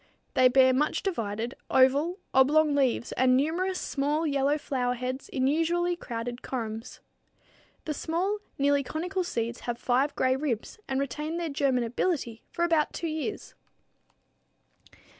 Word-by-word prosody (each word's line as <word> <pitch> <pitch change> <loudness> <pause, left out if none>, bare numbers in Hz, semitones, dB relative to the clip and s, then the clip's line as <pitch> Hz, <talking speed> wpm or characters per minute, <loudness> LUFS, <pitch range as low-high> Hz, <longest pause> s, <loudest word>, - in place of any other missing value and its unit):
They 255 - +6
bear 260 0 +5
much 295 +4 0
divided, 230 - -2 0.2
oval, 280 +7 +4 0.2
oblong 295 +3 +5
leaves 260 -4 +1
and 255 0 +3
numerous 360 +6 0
small, 295 +3 -1
yellow 280 0 +2
flower 250 -4 -1
heads 255 +2 -4
in 260 -1 0
usually 340 +4 +1
crowded 240 -5 -5
corymbs. 225 -2 -5 0.8
The 305 - -2
small, 360 +8 -1 0.2
nearly 285 0 +3
conical 360 +7 -2
seeds 235 -8 -3
have 240 -1 -1
five 260 +4 +1
gray 260 0 +2
ribs 265 - -3
and 265 0 -1
retain 300 +5 -3
their 335 -3 -2
germinability 255 -1 0
for 340 - -1
about 325 -3 +2
two 340 - -4
years. 315 +7 -4
275 Hz, 135 wpm, -28 LUFS, 250-320 Hz, 0.8 s, They